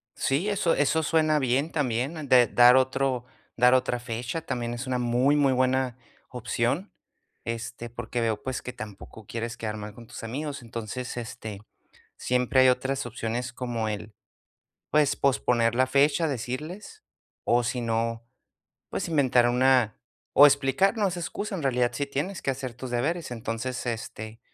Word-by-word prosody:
Sí, 145 +9 0
eso 195 -5 +1
eso 150 +2 +2
suena 155 -1 +2
bien 135 +4 +1
también 140 +2 -1
de 125 -2 +7
dar 120 +1 +7
otro 130 -1 +1 0.3
dar 125 +1 +6
otra 125 -1 +2
fecha 120 +5 -4
también 120 -5 -3
es 120 +2 -5
una 125 -1 0
muy, 125 +4 +2
muy 140 -2 +3
buena 130 -1 +1 0.3
opción, 125 - -2 0.5
este, 115 +1 -5
porque 120 0 -4
veo, 110 -2 0
pues, 130 -1 -3
que 125 - -6
tampoco 105 0 -10
quieres 115 0 -4
quedar 110 -1 -4
mal 105 0 -7
con 115 +1 -13
tus - - -9
amigos. 140 +4 -4
Entonces, 120 +2 -6
este, 110 -3 -6 0.6
siempre 125 +1 +2
hay 130 - +7
otras 130 +1 0
opciones 120 +1 -3
como 120 -3 -2
el, 105 0 -5 0.8
pues, 150 -2 +3
posponer 120 -4 +2
la 130 +1 +4
fecha, 140 +5 +3
decirles, 155 - -6 0.4
o 120 +1 +3
si 125 +1 -1
no, 115 0 -1 0.7
pues, - - -3
inventar 130 -6 +3
una 125 -2 +3 0.4
o 145 - +9
explicar, 140 - +2
no 205 -2 +2
es 175 - -5
excusa, 200 +4 -4
en 165 - -5
realidad 125 -2 +2
sí 140 - -1
tienes 145 +6 -3
que 135 - 0
hacer 130 -2 -5
tus 125 +1 -7
deberes. 155 +8 -1
Entonces, 120 +2 -4
este, 110 -1 -5
125 Hz, 160 wpm, -27 LUFS, 120-140 Hz, 0.8 s, o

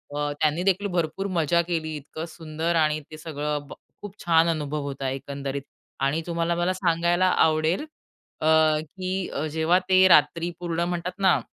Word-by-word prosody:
अ, 145 0 -1
त्यांनी 155 +3 +2
देखील 195 +1 +1
भरपूर 175 +1 -2
मजा 170 +2 +3
केली, 160 -2 -3
इतकं 150 +2 -7
सुंदर 160 +1 -3
आणि 155 -1 +2
ते 155 - -8
सगळं 150 -2 -4
ब - - -9 0.3
खूप 205 -1 -8
छान 165 -1 +4
अनुभव 150 -2 -2
होता 135 -1 -3
एकंदरीत 140 +1 -4 0.4
आणि 140 +4 +1
तुम्हाला 170 0 0
मला 175 +2 +1
सांगायला 175 0 +1 0.2
आवडेल 160 - +1 0.6
अ, - - -1 0.4
की 185 +3 -4
अ, 145 - -2
जेव्हा 160 +4 +2
ते 185 0 +6
रात्री 170 0 +4
पूर्ण 170 -1 -2
म्हणतात 175 0 -2
ना, 190 -2 +4
165 Hz, 160 wpm, -25 LUFS, 150-175 Hz, 0.6 s, ते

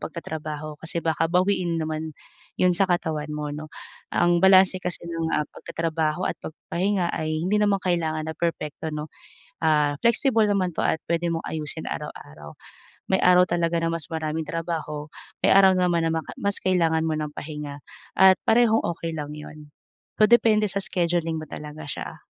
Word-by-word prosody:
pagtatrabaho 155 -2 -6
kasi 165 +1 -2
baka 165 0 +1
bawiin 180 -2 +1
naman 155 0 -4 0.4
'yun 180 - +4
sa 195 +2 +3
katawan 160 -4 -1
mo, 150 -1 -4
no. 155 +1 -6 0.5
Ang 175 0 +3
balanse 190 0 +6
kasi 180 -1 -3
ng, 165 -1 -2
ah, - - +2
pagtatrabaho 165 +1 -2
at - - -6
pagpapahinga 180 +3 -2
ay 155 0 -2
hindi 195 +4 +1
naman 205 -1 +3
kailangan 160 -3 -1
na - - -7
perpekto 160 -2 -3
no. 150 0 -5 0.5
Ah, 150 -2 +2
flexible 235 -1 +3
naman 185 -4 +1
'to - - +1
at 160 - +1
pwede 170 0 +1
mong 165 - -2
ayusin 155 -2 -4
araw-araw. 75 0 -8 0.6
May 190 - +4
araw 180 0 +6
talaga 170 0 +1
na 165 - +1
mas 165 -3 -5
maraming 160 0 -2
trabaho, 160 -3 -4 0.4
may - - +5
araw 195 0 +7
naman 175 -2 +2
na - - 0
maka 160 -1 -4
mas 200 0 +2
kailangan 165 -4 +2
mo 160 - 0
ng 150 -1 -3
pahinga 150 -2 -6 0.4
at 190 0 +7
parehong 225 -1 +4
okey 165 -1 -4
lang 150 -1 -5
'yun. 150 0 -11 0.5
So 215 - +6
depende 220 -3 +5
sa 200 - -1
scheduling 170 -3 0
mo 155 - -8
talaga 150 +1 -8
siya. - - -6
165 Hz, 170 wpm, -24 LUFS, 155-180 Hz, 0.6 s, araw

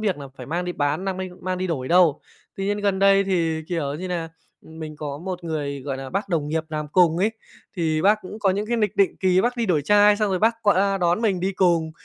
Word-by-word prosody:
việc 205 -4 0
là 140 -2 -8
phải 125 - -9
mang 175 +4 -2
đi 180 - -3
bán 145 +3 -1
nang 190 -1 -2
minh 185 -1 -6
mang 185 0 -3
đi 185 - -2
đổi 135 -7 -3
đâu. 170 -4 +4 0.4
Tuy 195 - -3
nhiên 205 +1 -1
gần 200 -2 0
đây 195 0 +5
thì, 165 -4 0
kiểu 155 -6 -2
như 180 +5 -5
là, 170 -2 -3 0.3
mình 160 -1 -9
có 145 -2 -5
một 180 +1 -6
người, 145 -4 -3
gọi 135 -1 -4
là, 135 0 -7
bác 195 +2 -2
đồng 155 -5 -1
nghiệp 160 +1 -1
làm 150 -1 -4
cùng 165 0 +3
ấy, 205 +4 +2 0.5
thì 160 -3 0
bác 210 +3 +4
cũng 200 +3 -8
có 200 -3 +2
những 200 +3 -2
cái 235 +2 0
lịch 210 -4 0
định 195 - +2
kỳ 185 -1 +3
bác 245 +4 0
đi 235 -2 -1
đổi 160 -6 +1
chai, 205 +5 +5
xong 210 -1 0
rồi 185 - 0
bác 225 +4 +3
qua 200 -1 +2
đón 175 +2 +1
mình 195 -5 +1
đi 190 +2 -1
cùng, 170 -4 +2
180 Hz, 265 wpm, -23 LUFS, 160-195 Hz, 0.5 s, đây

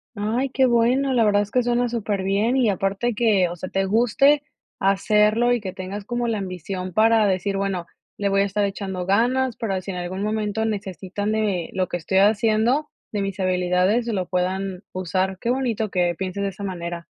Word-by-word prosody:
Ay, 225 +6 -1
qué 265 0 +3
bueno, 250 +3 +2
la 235 -3 +3
verdad 205 -1 +3
es 205 - -4
que 250 - +1
suena 240 0 +1
superbién 210 +1 0
y 250 -4 +3
aparte 195 +4 -1
que, 205 -6 +3
o 175 - -6
sea, 185 +2 -7
te 195 0 0
guste, 245 +7 +3 0.4
hacerlo 210 +4 +3
y 240 - +1
que 190 -2 -5
tengas 195 +2 -6
como 240 0 -2
la 225 -2 0
ambición 185 -1 -5
para 220 +1 +4
decir: 195 0 0
"Bueno, 195 -3 -2 0.3
le 200 -1 +1
voy 195 0 +3
a - - +4
estar 200 +1 0
echando 195 -2 -3
ganas, 245 +4 +2
para 195 -5 -2
si 195 - -9
en 180 - -4
algún 180 +2 -4
momento 215 +1 -1
necesitan 200 -1 -3
de 205 -6 -1
lo 185 -1 0
que 175 - -3
estoy 190 +3 +1
haciendo, 220 +7 +2 0.2
de 205 - -2
mis 195 0 -4
habilidades, 185 +4 +1
lo 195 -6 -2
puedan 185 +1 -2
usar". 185 +1 -2
Qué 235 - -2
bonito 240 -4 0
que 175 -2 +1
pienses 190 +2 -4
de 200 - 0
esa 200 +2 -9
manera. 170 -3 -5
200 Hz, 195 wpm, -23 LUFS, 185-230 Hz, 0.4 s, para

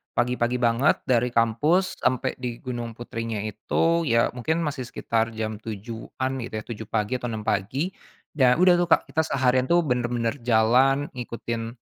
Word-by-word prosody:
pagi-pagi 125 0 +1
banget 120 +3 +2
dari 125 -1 +2
kampus 125 - +1
sampai 130 0 0
di 125 -2 -3
Gunung 120 -3 -5
Putrinya 115 -2 -4
itu 165 +10 0
ya 115 -1 +3
mungkin 160 +7 -1
masih 140 -5 -3
sekitar 115 -1 -1
jam 110 -1 -3
7.00-an 115 +4 -5
gitu 115 - -8
ya - - -9
7.00 110 -2 -7
pagi 110 +3 -1
atau 120 - -4
6.00 110 -2 -4
pagi, 120 - -1 0.4
dan 130 -4 +4
udah 180 -1 +6
tuh, 175 - +1
Kak, 165 - +4
kita 160 0 +1
seharian 130 -1 +2
tuh 175 0 +4
bener-bener 120 -2 -1
jalan 125 +5 +3
ngikutin, 115 -2 -5
120 Hz, 160 wpm, -25 LUFS, 115-135 Hz, 0.4 s, udah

